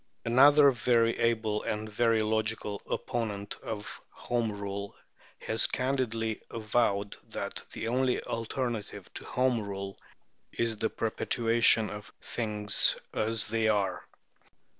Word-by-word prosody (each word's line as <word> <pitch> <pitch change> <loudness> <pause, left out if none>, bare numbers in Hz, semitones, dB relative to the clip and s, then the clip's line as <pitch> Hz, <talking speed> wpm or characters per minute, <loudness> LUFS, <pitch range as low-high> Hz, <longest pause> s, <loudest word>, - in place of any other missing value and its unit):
Another 140 +4 +7
very 115 -1 +2
able 110 -2 +1
and 110 0 -3
very 110 0 +2
logical 110 -1 -1
opponent 105 -5 -3
of 105 -2 -6
Home 120 -2 -2
Rule 100 0 -5 0.4
has 110 0 +2
candidly 120 -4 -1
avowed 105 -2 0
that - - -5
the 115 - -4
only 125 +2 +1
alternative 115 -1 -4
to - - -6
Home 125 -2 +1
Rule 100 -1 -5 0.6
is 115 -2 0
the 110 - +1
perpetuation 115 0 +2
of 105 0 -8
"things 105 -3 +2 0.2
as 110 0 +1
they 110 0 +1
are." 100 -3 +1
110 Hz, 115 wpm, -29 LUFS, 105-120 Hz, 0.6 s, Another